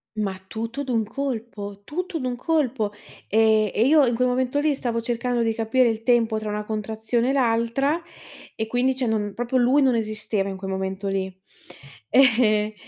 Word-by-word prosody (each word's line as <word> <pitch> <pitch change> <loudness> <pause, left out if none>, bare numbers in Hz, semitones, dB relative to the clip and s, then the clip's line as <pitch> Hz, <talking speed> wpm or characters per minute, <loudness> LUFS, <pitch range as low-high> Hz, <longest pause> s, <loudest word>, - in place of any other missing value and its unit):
Ma 205 -3 -1
tutto 230 +7 -4
d'un 235 -4 0
colpo, 220 -5 -5
tutto 360 - -4
d'un 250 -1 -2
colpo. 255 -7 0 0.4
Ehm 220 -1 +3
e 225 - +2
io 295 0 +6
in 235 - +1
quel 250 +1 +2
momento 255 +3 0
lì 300 0 +2
stavo 235 -4 -2
cercando 240 0 -1
di 225 0 +1
capire 230 +3 +2
il 225 -1 -1
tempo 230 -2 +2
tra 215 -1 -5
una 210 0 -3
contrazione 220 +3 -1
e - - +2
l'altra 260 +5 +1 0.5
e 220 - -2
quindi 250 +3 +1
cioè 260 -1 -1
non 210 -3 -1
proprio 240 +2 0
lui 260 +4 +4
non 255 -3 +3
esisteva 215 -2 -2
in 190 - -5
quel 190 0 -5
momento 190 +1 -3
lì. 190 -1 -1 0.8
E 220 -5 +4
230 Hz, 175 wpm, -24 LUFS, 215-255 Hz, 0.8 s, io